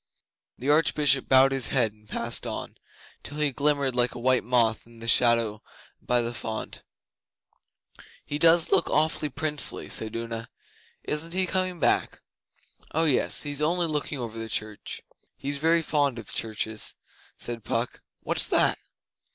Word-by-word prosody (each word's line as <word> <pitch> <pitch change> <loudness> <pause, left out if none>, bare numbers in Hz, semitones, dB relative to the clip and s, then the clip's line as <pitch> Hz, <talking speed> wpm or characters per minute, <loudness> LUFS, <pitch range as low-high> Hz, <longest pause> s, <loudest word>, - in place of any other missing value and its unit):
The 130 - -6
Archbishop 150 -3 +3
bowed 135 0 +6
his 135 -3 +1
head 120 -5 +1
and 105 0 -24
passed 115 +1 -1
on, - - -5 0.5
till 145 - -8
he 150 -2 +2
glimmered 140 -1 +1
like 125 0 +1
a - - -6
white 130 +1 +3
moth 115 -2 +1
in 115 0 -17
the 115 0 -9
shadow 115 -2 +3 0.4
by 120 -1 +1
the 120 +1 -4
font. 110 -1 -5 1.4
'He 145 - -4
does 165 +1 +5
look - - +3
awfully 155 0 +1
princely,' 150 +1 0
said 110 0 0
Una. 115 0 -4 0.5
'Isn't 160 +3 -1
he 190 0 +1
coming 185 -1 -1
back?' - - +1 0.7
'Oh 160 +2 +2
yes. 145 -5 +2
He's 145 0 -3
only 170 +3 +1
looking 150 -2 -2
over 115 -3 -5
the 115 0 -4
church. 105 -1 -5 0.3
He's 140 +1 -4
very 165 +2 +3
fond 145 -5 +1
of 115 -3 -7
churches,' 110 -1 -2 0.4
said 120 -2 -6
Puck. 115 +3 -2 0.2
'What's - - +1
that? - - +2
130 Hz, 150 wpm, -26 LUFS, 115-150 Hz, 1.4 s, bowed